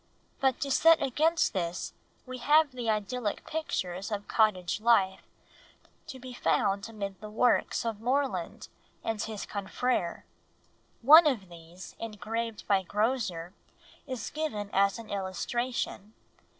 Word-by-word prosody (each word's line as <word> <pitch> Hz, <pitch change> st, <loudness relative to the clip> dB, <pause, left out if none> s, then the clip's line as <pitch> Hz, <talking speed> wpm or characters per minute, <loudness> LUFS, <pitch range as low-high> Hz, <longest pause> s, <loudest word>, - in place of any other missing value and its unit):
But 265 Hz, -2 st, +2 dB
to 280 Hz, -, -1 dB
set 325 Hz, +4 st, +6 dB
against 315 Hz, +6 st, +2 dB
this 175 Hz, -3 st, -3 dB, 0.3 s
we 255 Hz, -1 st, -7 dB
have 300 Hz, +3 st, +4 dB
the 245 Hz, -3 st, -4 dB
idyllic 215 Hz, +1 st, -2 dB
pictures 195 Hz, -, -3 dB
of 205 Hz, -1 st, -3 dB
cottage 210 Hz, -3 st, +1 dB
life 200 Hz, -5 st, +3 dB, 0.9 s
to 265 Hz, -, -7 dB
be 255 Hz, 0 st, -9 dB
found 200 Hz, -3 st, 0 dB
amid 200 Hz, -3 st, -6 dB
the 215 Hz, -, -7 dB
works 235 Hz, +2 st, +2 dB
of 220 Hz, -2 st, -3 dB
Morland 265 Hz, +3 st, -1 dB, 0.4 s
and 225 Hz, -2 st, -2 dB
his 215 Hz, -2 st, -4 dB
confrères. 200 Hz, -2 st, -2 dB, 0.8 s
One 310 Hz, +5 st, +9 dB
of 215 Hz, -10 st, -1 dB
these, 170 Hz, +2 st, -12 dB
engraved 225 Hz, +1 st, -4 dB
by 195 Hz, -2 st, +3 dB
Grozer, 200 Hz, -4 st, -1 dB, 0.5 s
is 255 Hz, -5 st, -5 dB
given 215 Hz, -10 st, -3 dB
as 195 Hz, +1 st, +3 dB
an 230 Hz, -1 st, -10 dB
illustration. 205 Hz, +3 st, -3 dB
220 Hz, 125 wpm, -29 LUFS, 195-255 Hz, 0.9 s, One